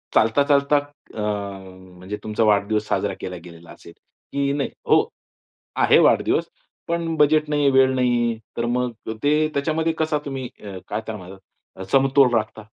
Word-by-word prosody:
चालता-चालता, 140 +5 +3 0.4
अ, 110 - -4 0.8
म्हणजे 95 +3 -6
तुमचा 110 +1 -1
वाढदिवस 105 0 +1
साजरा - - -1
केला 90 - -5
गेलेला 85 -1 -13
असेल 85 - -14 0.4
की 140 0 0
नाही, 140 -1 -1 0.2
हो, - - +4 0.7
आहे - - +5
वाढदिवस, - - +3 0.4
पण 170 -1 -2
बजेट 150 0 +3
नाही, 145 -2 +2
वेळ 130 0 +4
नाहीये, 120 -2 +1 0.2
तर 115 - 0
मग 125 0 -1 0.3
ते 150 +1 +3
त्याच्यामध्ये 160 +3 0
कसा 155 -1 +1
तुम्ही 135 -3 -4 0.2
अ, 100 -2 -7
काय 105 +2 -3
त्यामध्ये 95 -3 -8 0.4
अ, 95 - -8
समतोल 135 -2 +4
राखता? 110 0 -2
125 Hz, 145 wpm, -22 LUFS, 110-145 Hz, 0.8 s, आहे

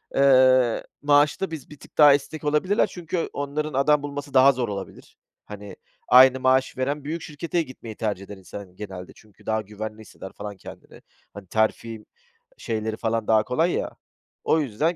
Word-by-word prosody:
eee, 130 -3 +4 0.2
maaşta, 145 +5 +2
biz 160 -3 -8
bir 150 - -13
tık - - -17
daha 150 -2 +8
esnek 145 +3 -3
olabilirler, 150 +8 +1
çünkü 175 -1 -4
onların 145 +2 -3
adam 145 +2 +2
bulması 145 0 -6
daha 135 +1 +7
zor 125 -3 -3
olabilir. 100 -1 -8 0.3
Hani, 105 -1 -10 0.3
aynı 130 +1 +7
maaşı 130 +1 +2
veren, 140 +3 -2
büyük 165 +3 -4
şirkete 165 +4 -3
gitmeyi 120 -7 -9
tercih 105 -4 -3
eder 100 0 -10
insan, 95 +2 -9
hani, 90 -3 -13
genelde. 95 -3 -8
Çünkü, 105 -2 -21
daha 110 0 0
güvenli 110 +1 -8
hisseder 95 -2 -11
falan 100 -1 -8
kendini. - - -13 0.3
Hani, 100 -1 -11
terfi 110 +2 -1 0.5
şeyleri 110 0 -3
falan 115 -1 -2
daha 110 -1 +4
kolay 160 +10 0
ya. - - -2 0.5
O 160 - +2
yüzden, 150 +6 -1
130 Hz, 170 wpm, -24 LUFS, 110-145 Hz, 0.5 s, daha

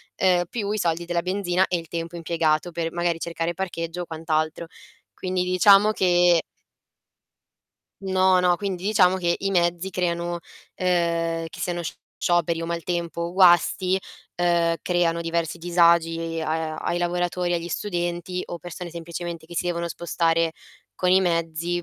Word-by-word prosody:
ehm, 180 -2 +3
più 210 -4 -3
i 215 - -1
soldi 170 -1 0
della 170 0 -1
benzina 185 0 +1
e 180 - 0
il 165 -1 -8
tempo 165 0 -5
impiegato 165 0 0
per 165 0 -3
magari 175 -1 0
cercare 170 0 -3
parcheggio 170 -1 -4
o - - -8
quant'altro. 160 0 -2 0.5
Quindi 185 -1 -2
diciamo 195 +3 +5
che 175 -3 +4 1.6
No, 185 -1 +3
no, 180 -1 +3
quindi 190 -2 -4
diciamo 190 -3 +4
che 175 -2 +1
i 195 - -1
mezzi 175 0 +1
creano, 175 -1 -2 0.3
ehm, 170 -2 0
che - - -11
siano 175 -1 -2 0.4
scioperi 170 -1 +1
o 165 - -3
maltempo 170 0 -3
o 170 +1 -3
guasti, 185 0 +4 0.4
ehm, 170 -1 +2
creano 170 -2 +1
diversi 165 0 -2
disagi 165 -1 +2
a 155 0 -2
ai 175 - -2
lavoratori, 175 0 -1
agli 170 0 -3
studenti 175 -1 -3
o 175 - -7
persone 175 0 -8
semplicemente 170 -1 -6
che 170 0 -10
si - - 0
devono 170 -1 -2
spostare 165 -1 0 0.4
con 180 - 0
i 190 +1 +5
mezzi, 170 0 -1
175 Hz, 150 wpm, -24 LUFS, 165-180 Hz, 1.6 s, diciamo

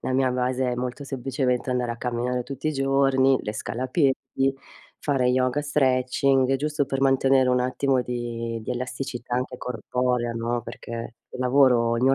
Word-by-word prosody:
La 130 - -2
mia 130 0 +2
base 125 0 0
è - - -1
molto 125 +3 -4
semplicemente 130 -1 -1
andare 125 -1 0
a - - -8
camminare 125 +1 -2
tutti 135 +3 -6
i - - 0
giorni, 135 -1 +3
le 105 - -4
scale 110 +3 -4
a - - 0
piedi, 135 +1 +3 0.9
fare 135 -4 +1
yoga, 130 +2 +2
stretching, 135 -1 +2
giusto 150 0 -1
per 135 0 -2
mantenere 135 -1 +4
un 125 0 +3
attimo 130 +1 +1
di 120 -1 -4
di - - -5
elasticità 125 0 -4
anche 125 0 -3
corporea 125 0 -1
no, 115 +1 -2
perché 115 0 -7
il - - -9
lavoro 125 -3 +4
il 115 - -2
mio 135 +1 +5
125 Hz, 175 wpm, -25 LUFS, 120-135 Hz, 0.9 s, mio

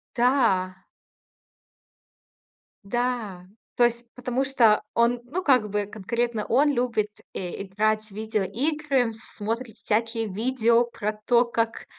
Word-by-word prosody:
Да. 230 -8 +2 2.1
Да. 225 -5 -2 0.3
То 240 - +3
есть 240 0 +1
потому 250 +1 -1
что 235 -6 +4
он, 235 +1 +2
ну, 350 +9 -3
как 250 -7 +3
бы, 205 0 -1
конкретно 225 +2 -2
он 285 +5 +3
любит, 240 -5 0 0.3
э, 180 +1 -5
играть 215 +3 0
в - - -19
видеоигры, 230 - -1
смотрит 225 +1 -5
всякие 225 +1 -1
видео 235 +3 +2
про 215 -2 -3
то, 240 0 +4
как 230 -1 -2
230 Hz, 115 wpm, -25 LUFS, 210-245 Hz, 2.1 s, что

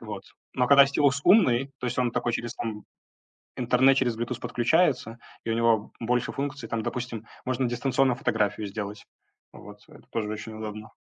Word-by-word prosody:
Вот. - - -7 0.3
Но 125 - +1
когда 140 +1 +8
стилус 140 0 +2
умный, 135 - +4
то - - -4
есть, 120 - -3
он 125 -1 +2
такой 120 - -1
через, 120 0 -3
там, 110 -2 -5 0.7
интернет, 130 +2 +4
через 125 -4 +1
Bluetooth 120 +2 -3
подключается, 120 -3 +1 0.3
и 115 - -3
у - - +1
него 115 -2 +2
больше 120 +1 0
функций. 140 -4 -4
Там, 115 0 -2
допустим, 120 -2 -4 0.2
можно 130 0 0
дистанционно 130 +1 +1
фотографию 105 -6 -1
сделать. 105 +1 -6 0.5
Вот, 105 +1 -12
это - - -16
тоже 110 -2 -2
очень 110 +1 -6
удобно. 110 0 -7
120 Hz, 170 wpm, -26 LUFS, 110-135 Hz, 0.7 s, когда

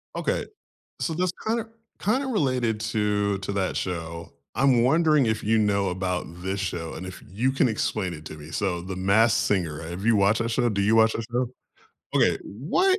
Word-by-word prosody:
Okay. - - -1 0.6
So, 165 - -1
this 180 +1 0
kinda 225 0 0 0.3
kinda 255 +7 +1
related 130 - 0
to 105 -3 0
to 100 +1 -4
that 95 -2 -1
show, 85 -2 -4 0.2
I'm 130 -3 +4
wondering 150 0 +4
if 110 -1 0
you 110 +1 +2
know 100 -2 +2
about 90 -2 -3
this 95 +1 -2
show, 85 -4 -3
and 90 +3 -6
if 90 - -9
you 120 +8 0
can 135 -2 +3
explain 105 -4 -1
it 75 0 -10
to 75 - -7
me, 75 +1 -11
so, 90 0 -1
The 95 +1 -6
Masked 105 +5 +4
Singer, 85 -7 0
have 85 +5 -6
you 115 -2 +5
watched 100 +3 +3
that 115 - -2
show 120 0 +2
do 100 -2 -1
you 110 +3 +4
watch 110 0 +5
that 115 - -3
show? 125 +1 +1 0.7
Okay, - - +4
what 365 - +1
105 Hz, 195 wpm, -25 LUFS, 95-125 Hz, 0.7 s, you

